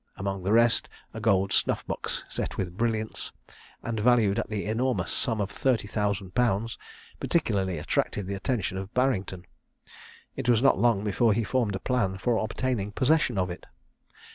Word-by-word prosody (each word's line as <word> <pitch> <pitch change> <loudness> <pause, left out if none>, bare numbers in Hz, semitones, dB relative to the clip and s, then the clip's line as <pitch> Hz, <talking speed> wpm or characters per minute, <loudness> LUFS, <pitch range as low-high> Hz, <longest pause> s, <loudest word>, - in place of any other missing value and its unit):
Among 95 0 -3
the 95 +3 -1
rest, 115 +1 +4 0.2
a - - -6
gold 95 0 +2
snuff - - +1
box, - - -4
set - - -4
with 90 -2 -3
brilliants, 110 0 -2 0.5
and 115 -2 -2
valued 110 -3 +3
at - - -3
the 105 -2 -3
enormous 120 +4 0
sum 115 -3 0
of 100 -1 -1
thirty 125 -6 0
thousand 100 -3 -2
pounds, 115 -2 0 0.4
particularly 95 - 0
attracted 90 +5 -1
the 100 - -4
attention 100 -2 -2
of 95 +1 -7
Barrington. 100 -8 0 0.9
It 130 -2 -2
was 120 -3 +5
not 135 +2 +4
long 115 -4 +3
before 110 +2 +2
he 115 +3 0
formed 115 -3 0
a - - -3
plan 95 -5 0
for 115 +4 +1
obtaining 110 -2 -2
possession 135 -3 +2
of 90 -1 0
it. 90 - -9
110 Hz, 165 wpm, -27 LUFS, 95-120 Hz, 0.9 s, was